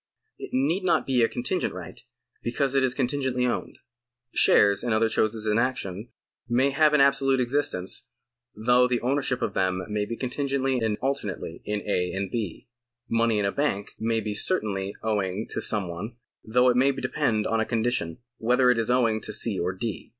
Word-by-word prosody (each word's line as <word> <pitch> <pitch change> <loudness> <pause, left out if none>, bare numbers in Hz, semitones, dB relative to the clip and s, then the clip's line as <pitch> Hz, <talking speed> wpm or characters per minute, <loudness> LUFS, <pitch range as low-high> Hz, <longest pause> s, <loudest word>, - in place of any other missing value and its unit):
It - - -7
need 155 +9 +1
not 180 - +2
be 130 -3 +2
a 115 - +4
contingent 130 - -2
right, 90 0 -9 0.4
because 130 +3 -1
it 135 - +3
is 130 -1 +1
contingently 130 -1 0
owned. 125 - -2 0.6
Shares 100 -1 +4
and 120 -3 +1
other 110 +1 +2
choses 110 0 0
in 105 +1 +2
action 115 -4 -2 0.4
may 130 +4 +3
have 150 +2 +4
an 145 - +5
absolute 135 -1 +3
existence, 125 -7 -1 0.5
though 125 +3 +4
the 125 -1 0
ownership 135 0 0
of - - -1
them 95 0 0
may 105 0 -1
be 115 +1 -5
contingently 135 0 -1
and 110 -2 0
alternately 105 -11 -3
in 105 -1 -2
A. 90 -3 0
and 95 -1 -3
B. 105 -8 -4 0.4
Money 115 -1 +2
in 105 - +1
a 100 - +1
bank 105 -8 -1
may 115 0 0
be 105 0 -3
certainly 100 - 0
owing 105 -1 -1
to - - -2
some 105 -4 -1
one, 100 +8 -6 0.3
though 125 +3 +3
it 125 - +2
may 135 +2 +4
depend 130 -5 -1
on 115 - +1
a - - +2
condition, 110 -8 -1 0.2
whether 125 +2 +4
it 120 - +1
is 115 - 0
owing 115 -3 +2
to - - -5
C. 105 -2 -1
or 90 +1 0
D. 105 +4 -5
115 Hz, 185 wpm, -26 LUFS, 105-130 Hz, 0.6 s, an